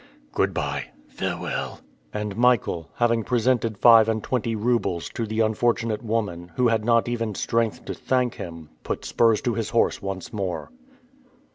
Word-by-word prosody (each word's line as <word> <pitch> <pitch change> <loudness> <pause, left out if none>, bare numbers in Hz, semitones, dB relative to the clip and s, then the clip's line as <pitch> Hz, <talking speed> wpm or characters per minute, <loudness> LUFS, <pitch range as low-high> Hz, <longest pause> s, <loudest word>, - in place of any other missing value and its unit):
"Good - - +1
by." - - -2 0.2
"Farewell." - - -4 0.3
And 105 -1 -4
Michael, 115 -9 +2
having 115 -1 +2
presented 120 -2 +1
five 115 0 +7
and 110 -1 -1
twenty 115 -3 -1
roubles 105 -6 0
to 115 - -4
the 110 +1 0
unfortunate 110 0 +1
woman, 100 -7 -2
who 125 -2 +3
had 110 -2 +1
not 115 +1 +3
even 115 -3 -2
strength 115 0 -1
to - - -4
thank 125 -2 0
him, 85 -3 -8
put - - -4
spurs 115 -2 +3
to 120 - 0
his 110 -1 -2
horse 115 - +2
once 95 -1 -5
more. 95 - -3
115 Hz, 155 wpm, -24 LUFS, 105-120 Hz, 0.3 s, five